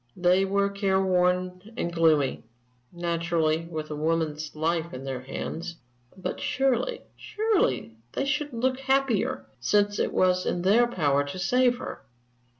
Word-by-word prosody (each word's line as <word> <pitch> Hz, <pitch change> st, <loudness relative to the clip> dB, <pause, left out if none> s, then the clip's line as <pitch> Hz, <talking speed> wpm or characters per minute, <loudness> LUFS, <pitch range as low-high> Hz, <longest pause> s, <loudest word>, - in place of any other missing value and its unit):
They 180 Hz, +2 st, +3 dB
were 200 Hz, +1 st, +1 dB
care 195 Hz, -1 st, +1 dB
worn 180 Hz, -1 st, +1 dB, 0.2 s
and 170 Hz, -7 st, -2 dB
gloomy 155 Hz, -5 st, +2 dB, 0.5 s
naturally, 170 Hz, -2 st, 0 dB
with 155 Hz, -2 st, -5 dB
a -, -, -3 dB
woman's 155 Hz, -1 st, -1 dB
life 165 Hz, 0 st, -1 dB
in 130 Hz, -, -7 dB
their 135 Hz, -2 st, -4 dB
hands; 165 Hz, +6 st, -5 dB, 0.4 s
but 185 Hz, -, -4 dB
surely 270 Hz, -, 0 dB
surely 375 Hz, -, 0 dB, 0.2 s
they 275 Hz, -, -1 dB
should 295 Hz, +1 st, -1 dB
look 255 Hz, +2 st, 0 dB
happier, 270 Hz, -5 st, +1 dB
since 205 Hz, +12 st, +2 dB
it -, -, +1 dB
was 185 Hz, 0 st, +2 dB
in 175 Hz, -, -1 dB
their 225 Hz, +6 st, +5 dB
power 145 Hz, -10 st, +1 dB
to 145 Hz, +6 st, -6 dB
save 245 Hz, +6 st, +2 dB
her? -, -, -7 dB
180 Hz, 145 wpm, -26 LUFS, 160-225 Hz, 0.5 s, their